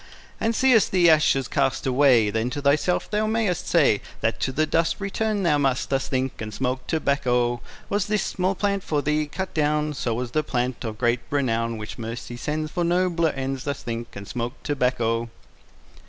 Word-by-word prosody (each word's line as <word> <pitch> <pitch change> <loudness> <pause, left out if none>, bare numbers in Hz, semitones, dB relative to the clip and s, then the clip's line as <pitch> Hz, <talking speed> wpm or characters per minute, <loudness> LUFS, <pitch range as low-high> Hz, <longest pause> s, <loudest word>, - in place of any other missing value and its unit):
And 225 +1 0
seest 255 -4 +4
the 175 -3 +5
ashes 145 -4 +3
cast 135 -3 0
away, 125 -5 +4
Then 110 +3 -1
to 145 +3 -4
thyself 145 +5 +2
thou 215 +1 +1
mayest 220 -5 0
say, 145 -11 +3 0.2
That 115 - 0
to 130 - -1
the 155 +4 +1
dust 165 +1 +1
Return 205 +1 -1
thou 150 -4 +3
must. 135 -2 0
Thus 135 -1 0
think, 130 -2 -2
and 110 -1 -5
smoke 130 +3 -2
tobacco. 125 -6 +1
Part - - -20
II - - -17 0.2
Was 205 -1 0
this 210 -1 +1
small 185 +1 -1
plant 200 0 0
for 150 -2 -1
thee 150 +1 +1
cut 190 +5 -5
down? 150 0 +1
So 120 -4 -2
was 120 0 -3
the 155 - +1
plant 125 -4 -2
of 110 -2 -5
great 120 +1 +2
renown, 115 -5 0
Which 105 +3 -7
Mercy 115 +1 -6
sends 155 +5 -3
For 175 - -1
nobler 170 -1 +2
ends. 135 -1 -3
Thus 140 -2 -4
think, 115 0 -5
and 100 0 -8
smoke 120 0 -3
tobacco. 120 -5 0
140 Hz, 195 wpm, -24 LUFS, 120-170 Hz, 0.2 s, the